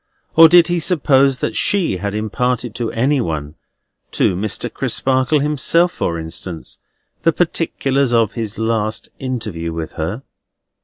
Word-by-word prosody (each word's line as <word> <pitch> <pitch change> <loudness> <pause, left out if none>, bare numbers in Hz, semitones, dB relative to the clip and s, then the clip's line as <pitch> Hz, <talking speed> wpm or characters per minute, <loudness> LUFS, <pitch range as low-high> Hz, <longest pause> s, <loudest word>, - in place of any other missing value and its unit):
or 165 0 +9
did 175 0 +7
he 175 0 0
suppose 140 -5 +3
that 115 - -3
she 185 - +1
had 100 +2 -4
imparted 120 +2 -1
to 115 0 -3
any 135 +4 +1
one—to 80 +2 -4
Mr. 100 +3 -2
Crisparkle 130 +2 +1
himself, 150 +4 +2
for 85 - -2
instance—the 85 - -5
particulars 140 -6 0
of 115 -3 +2
his 115 -3 -4
last 110 -1 -1
interview 105 -11 -4
with 80 -1 -5
her? 90 - -4
120 Hz, 125 wpm, -18 LUFS, 100-145 Hz, -, or